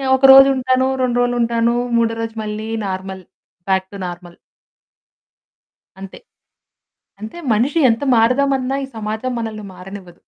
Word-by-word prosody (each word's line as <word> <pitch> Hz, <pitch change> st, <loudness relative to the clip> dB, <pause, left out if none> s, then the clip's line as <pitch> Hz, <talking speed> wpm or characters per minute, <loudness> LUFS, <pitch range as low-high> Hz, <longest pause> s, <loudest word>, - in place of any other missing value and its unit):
ఒకరోజు 270 Hz, 0 st, +8 dB
ఉంటాను, 260 Hz, 0 st, +1 dB, 0.2 s
2 245 Hz, -1 st, 0 dB
రోజులుంటాను. 235 Hz, -1 st, 0 dB, 0.2 s
మూడో 230 Hz, -1 st, +1 dB
రోజు 225 Hz, 0 st, -5 dB
మళ్ళీ 215 Hz, +1 st, -5 dB, 0.2 s
నార్మల్, 190 Hz, 0 st, -6 dB, 0.5 s
బ్యాక్ 190 Hz, 0 st, +1 dB
టు 200 Hz, -, -9 dB
నార్మల్. 175 Hz, 0 st, -10 dB, 1.6 s
అంతే. 195 Hz, -1 st, -10 dB, 1.0 s
అంతే 220 Hz, +10 st, -8 dB
మనిషి 250 Hz, +10 st, +1 dB
ఎంత 225 Hz, +3 st, -2 dB
మారుదామన్న 255 Hz, +3 st, +1 dB
ఈ -, -, -17 dB
సమాజం 220 Hz, +4 st, -4 dB
మనల్ని 215 Hz, -2 st, -6 dB
మారనివ్వదు. 185 Hz, -1 st, -11 dB
225 Hz, 115 wpm, -18 LUFS, 195-255 Hz, 1.6 s, ఒకరోజు